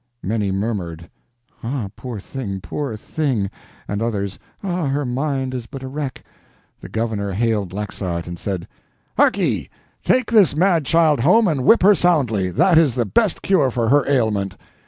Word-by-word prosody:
Many 105 0 -1
murmured, 95 -5 -3 0.6
"Ah, 115 -3 -3
poor 120 -5 -6
thing, 100 -3 -5
poor 125 +3 -4
thing!" 120 -6 -2 0.4
and 100 +1 -3
others, 100 -4 -2 0.2
"Ah, 180 -5 -1
her 140 +1 -1
mind 130 +1 -2
is 120 -2 -5
but 135 +1 -8
a - - -5
wreck!" 140 0 -5 0.6
The - - -10
governor 110 -3 -2
hailed 105 -3 0
Laxart, 95 -4 -4
and 85 -1 -7
said: 95 -4 -4 0.5
"Harkye!—take 255 -1 0
this 205 -9 +5
mad 170 -4 +2
child 160 -4 +4
home 195 - +4
and 140 -7 0
whip 225 +1 +6
her 205 +2 +7
soundly. 130 - +2
That 170 - +4
is 145 -7 +2
the 120 -2 +1
best 210 - +1
cure 155 -9 +3
for 115 -2 -1
her 140 +1 +3
ailment." 110 -8 0
125 Hz, 155 wpm, -20 LUFS, 100-150 Hz, 0.6 s, her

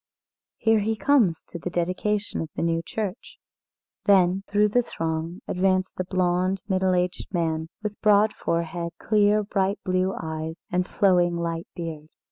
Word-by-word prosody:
Here 225 -1 +3
he 220 +2 0
comes 215 - +3
to 170 - -9
the 180 - -4
dedication 185 +4 -1
of 160 - -5
the - - -2
new 165 0 +1
church." 205 +3 -5 0.7
Then, 190 -1 +4
through 210 +1 +3
the 245 +4 +3
throng 165 -3 -4
advanced 185 0 0
a - - +1
blonde, 185 +1 +1
middle 190 -2 +2
aged 180 0 -2
man, 160 -3 -1
with 210 -1 -4
broad 210 0 +4
forehead, 170 0 -2
clear, 210 0 +3
bright 195 0 0
blue 185 0 +1
eyes, 160 0 -4 0.2
and 180 0 0
a - - -22
flowing 175 -3 +3
light 170 0 -3
beard. 160 -3 -6
185 Hz, 155 wpm, -25 LUFS, 170-205 Hz, 0.7 s, Then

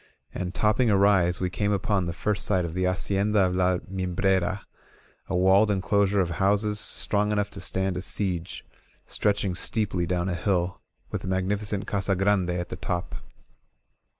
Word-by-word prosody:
And, 90 +1 -4
topping 110 +3 +2
a 100 - +4
rise, 95 -3 +3
we 90 -1 -1
came 105 +3 0
upon 100 -1 0
the - - -1
first 100 +3 -1
sight 95 -4 +2
of 80 - -5
the 90 +1 0
Hacienda 100 +3 +1
of 90 0 -1
La 90 0 +2
Mimbrera, 95 +1 0 0.7
a 95 - -2
walled 95 +4 +5
enclosure 100 0 +2
of 90 -3 +1
houses 105 +2 +1
strong 105 -1 -1
enough 105 -1 0
to - - -7
stand 95 -1 -1
a - - -3
siege, 90 -2 -3 0.4
stretching 100 -2 0
steeply 95 -2 -1
down 90 +1 -1
a 95 - -1
hill, 90 +1 -1 0.3
with - - -3
the - - -7
magnificent 100 +2 -1
Casa 95 -1 0
Grande 95 -1 +2
at 90 0 -2
the - - -6
top. 90 -1 -3
95 Hz, 170 wpm, -26 LUFS, 90-105 Hz, 0.7 s, walled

